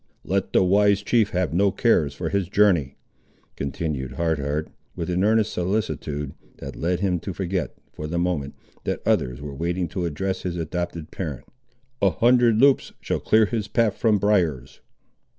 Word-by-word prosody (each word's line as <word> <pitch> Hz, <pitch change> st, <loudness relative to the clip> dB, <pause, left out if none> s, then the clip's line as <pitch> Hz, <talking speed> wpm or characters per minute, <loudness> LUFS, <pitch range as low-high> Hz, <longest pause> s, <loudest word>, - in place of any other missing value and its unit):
"Let 95 Hz, 0 st, -1 dB
the -, -, +4 dB
wise 100 Hz, +2 st, +3 dB
chief 110 Hz, -2 st, +2 dB
have 90 Hz, -2 st, -1 dB
no 100 Hz, +3 st, +3 dB
cares 95 Hz, -, +2 dB
for -, -, -3 dB
his 100 Hz, -3 st, -1 dB
journey," 95 Hz, -10 st, +3 dB, 0.6 s
continued 70 Hz, -2 st, -3 dB
Hard 80 Hz, -2 st, 0 dB
Heart 70 Hz, +2 st, -2 dB, 0.3 s
with 85 Hz, 0 st, -3 dB
an 90 Hz, +2 st, +1 dB
earnest 110 Hz, 0 st, +2 dB
solicitude, 85 Hz, -7 st, -2 dB, 0.2 s
that -, -, -8 dB
led 90 Hz, +2 st, -1 dB
him 90 Hz, -3 st, +1 dB
to 90 Hz, +2 st, -6 dB
forget, 95 Hz, -2 st, -2 dB, 0.2 s
for 75 Hz, -, -6 dB
the 85 Hz, +2 st, -3 dB
moment, 85 Hz, -6 st, -1 dB, 0.3 s
that -, -, -3 dB
others 60 Hz, +2 st, +1 dB
were 75 Hz, -1 st, -6 dB
waiting 85 Hz, +5 st, -2 dB
to 90 Hz, +1 st, -3 dB
address 95 Hz, +4 st, -2 dB
his 90 Hz, -1 st, -3 dB
adopted 85 Hz, 0 st, -4 dB
parent; 75 Hz, -9 st, -5 dB, 0.6 s
"a 100 Hz, -, +5 dB
hundred 120 Hz, +3 st, +4 dB
Loups 140 Hz, +1 st, +4 dB
shall -, -, -2 dB
clear 110 Hz, 0 st, +4 dB
his 105 Hz, -1 st, -2 dB
path 110 Hz, 0 st, +1 dB
from 110 Hz, -3 st, +2 dB
briars." 90 Hz, -11 st, 0 dB
90 Hz, 170 wpm, -24 LUFS, 80-100 Hz, 0.6 s, a